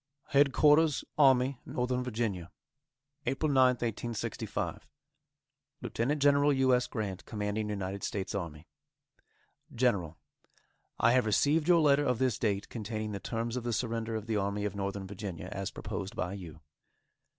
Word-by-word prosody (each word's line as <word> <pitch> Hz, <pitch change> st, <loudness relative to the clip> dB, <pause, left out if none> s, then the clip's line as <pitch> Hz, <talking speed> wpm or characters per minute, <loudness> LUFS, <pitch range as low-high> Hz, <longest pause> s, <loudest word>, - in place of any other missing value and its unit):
H'DQ'RS 145 Hz, +2 st, +4 dB, 0.2 s
ARMY 130 Hz, -2 st, +4 dB
NORTHERN 125 Hz, 0 st, -1 dB
VA., 105 Hz, -8 st, -2 dB, 0.8 s
APRIL 145 Hz, +3 st, 0 dB
9, 130 Hz, -2 st, +6 dB
1865. 120 Hz, -1 st, -4 dB, 1.0 s
Lieutenant 140 Hz, +6 st, -1 dB
General 145 Hz, +1 st, +4 dB
U. 130 Hz, -1 st, +3 dB
S. 125 Hz, 0 st, +2 dB
Grant, 100 Hz, -4 st, -4 dB
Commanding 105 Hz, 0 st, -3 dB
United 100 Hz, -1 st, -3 dB
States 95 Hz, -2 st, -3 dB
Army: 85 Hz, -4 st, -5 dB, 1.1 s
GENERAL: 100 Hz, -10 st, +1 dB, 0.8 s
I 115 Hz, -, +5 dB
have 125 Hz, -2 st, +3 dB
received 150 Hz, +9 st, +2 dB
your 175 Hz, -2 st, +6 dB
letter 145 Hz, -1 st, +4 dB
of 125 Hz, -4 st, +1 dB
this 130 Hz, -3 st, 0 dB
date 100 Hz, -3 st, 0 dB
containing 110 Hz, -1 st, -4 dB
the 100 Hz, -, -4 dB
terms 115 Hz, +3 st, -3 dB
of 125 Hz, -, -3 dB
the 120 Hz, -, -2 dB
surrender 115 Hz, -1 st, -2 dB
of 110 Hz, -1 st, -4 dB
the 110 Hz, -2 st, -1 dB
Army 100 Hz, +1 st, -1 dB
of 105 Hz, -, -3 dB
Northern 100 Hz, 0 st, -3 dB
Virginia, 95 Hz, -3 st, -6 dB
as 100 Hz, -1 st, -3 dB
proposed 100 Hz, -1 st, -6 dB
by 90 Hz, +1 st, -2 dB
you. 85 Hz, -6 st, -9 dB
115 Hz, 140 wpm, -31 LUFS, 100-130 Hz, 1.1 s, 9